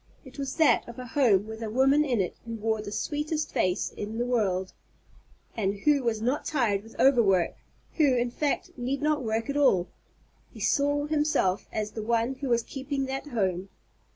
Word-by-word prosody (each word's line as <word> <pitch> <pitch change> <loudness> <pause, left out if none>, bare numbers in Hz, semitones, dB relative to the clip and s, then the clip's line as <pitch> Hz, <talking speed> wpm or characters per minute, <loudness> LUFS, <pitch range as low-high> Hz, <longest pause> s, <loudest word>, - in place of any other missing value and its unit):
It 265 +2 -12
was 275 -1 -3
that 320 -3 +3
of 235 - -10
a 255 - -6
home, 230 -7 +3
with 220 +1 -8
a 225 - -3
woman 270 +6 +4
in 255 -7 0
it 180 - -3
who 230 -1 -6
wore 220 0 -1
the 205 -1 -7
sweetest 300 +5 -2
face 180 0 0
in 210 +2 -6
the 240 - 0
world, 195 -7 0 0.8
and 200 -3 0
who 295 -2 +3
was 225 -3 -1
not 255 +5 0
tired 230 -9 0
with 225 +2 -16
overwork, 215 -10 +4 0.4
who, 290 -5 +4
in 240 0 0
fact, 290 +3 -1
need 265 +4 -3
not 300 -1 +2
work 225 0 -1
at 280 0 -2
all. 195 -11 +3 0.6
He - - -12
saw 290 0 +1
himself 295 -11 +1
as 215 -1 -3
the 220 - -5
one 230 +3 +1
who 275 - -2
was 235 -1 +2
keeping 270 +1 -3
that 270 +2 -4
home. 190 -7 -1
240 Hz, 190 wpm, -27 LUFS, 215-280 Hz, 0.8 s, woman